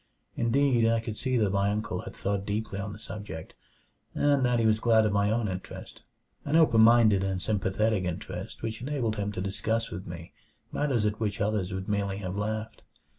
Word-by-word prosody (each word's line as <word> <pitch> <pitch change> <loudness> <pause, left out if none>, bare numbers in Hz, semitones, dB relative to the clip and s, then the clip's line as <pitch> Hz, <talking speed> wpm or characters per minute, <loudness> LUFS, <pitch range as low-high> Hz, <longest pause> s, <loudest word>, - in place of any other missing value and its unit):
Indeed, 120 -1 +3
I 115 0 +3
could 110 -1 -5
see 130 +2 0
that 105 -4 +2
my 100 0 +2
uncle 105 +1 -2
had - - -9
thought 100 0 -2
deeply 105 -1 -3
on 100 +1 -4
the 100 - -8
subject, 100 -6 -8 0.6
and 145 -2 +3
that 125 -1 +2
he 115 - +2
was 110 -1 +3
glad 110 -1 +4
of 105 - +1
my 100 0 +2
own 110 0 +1
interest 95 -1 -7 0.4
an 145 - -1
open 155 -9 +5
minded 110 -4 +6
and 95 -1 -1
sympathetic 105 +1 0
interest 90 +4 -5
which 115 0 -4
enabled 125 -5 -1
him 105 0 -2
to 90 - -4
discuss 110 +4 -1
with 90 +2 -6
me 85 0 -8 0.4
matters 130 -7 0
at 105 0 -1
which 105 -3 -2
others 105 -2 0
would 95 +1 -4
merely 100 -2 -1
have 95 -2 -4
laughed. 110 +2 -3
105 Hz, 195 wpm, -28 LUFS, 100-115 Hz, 0.6 s, minded